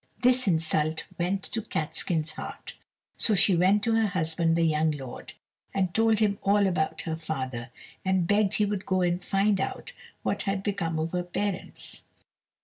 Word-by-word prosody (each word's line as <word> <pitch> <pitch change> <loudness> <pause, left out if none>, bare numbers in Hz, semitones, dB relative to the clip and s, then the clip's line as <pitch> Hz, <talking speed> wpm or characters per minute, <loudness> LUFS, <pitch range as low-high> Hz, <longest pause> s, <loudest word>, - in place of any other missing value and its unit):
This 255 -1 +4
insult 160 -2 +1
went 185 +3 0
to 225 - -3
Catskin's 160 -2 -2
heart, - - -8 0.4
so 215 - +3
she 190 0 +4
went 190 +4 +4
to 230 - +2
her 225 -1 +3
husband, 165 -2 +1
the 170 - +2
young 160 -1 +3
lord, 135 -5 -6 0.4
and 185 -3 +1
told 225 -1 +4
him 205 -2 +1
all 200 +1 +3
about 175 -5 0
her 160 - -3
father, 130 -6 -4 0.3
and 190 -2 +2
begged 205 +1 +2
he 210 - +3
would 200 -1 -3
go 185 -1 +2
and 175 +1 0
find 195 0 +2
out - - -4 0.3
what - - 0
had 195 0 -1
become 180 -6 -1
of 160 +1 -1
her 180 - 0
parents. 185 +2 -3
180 Hz, 170 wpm, -27 LUFS, 160-200 Hz, 0.4 s, This